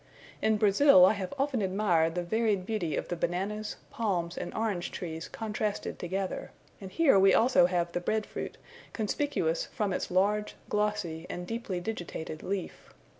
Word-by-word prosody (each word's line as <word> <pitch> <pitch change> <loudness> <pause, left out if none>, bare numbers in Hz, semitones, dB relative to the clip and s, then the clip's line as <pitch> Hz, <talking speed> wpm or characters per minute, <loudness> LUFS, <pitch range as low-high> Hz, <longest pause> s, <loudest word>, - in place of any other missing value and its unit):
In 220 0 +3
Brazil 205 -1 +7
I 190 - +5
have 195 -3 -4
often 275 -4 0
admired 185 -4 +2
the 180 - -1
varied 210 0 0
beauty 195 -7 -1
of - - -3
the 175 - -1
bananas, 195 +5 -2 0.2
palms, 180 -6 -1
and - - -5
orange 205 -6 -1
trees 165 -2 -6
contrasted 210 -1 -3
together; 190 +2 -3 0.3
and 190 -1 -8
here 290 -9 +5
we 195 0 +6
also 230 -6 +5
have 175 -1 0
the 175 - -2
bread 215 +4 0
fruit, - - -6 0.4
conspicuous 215 - 0
from 205 -3 -2
its - - -2
large, 205 +3 +1
glossy, 210 -6 -1
and 175 - -5
deeply 220 -3 -3
digitated 175 -5 -5
leaf. 195 -1 -5
195 Hz, 160 wpm, -29 LUFS, 175-215 Hz, 0.4 s, Brazil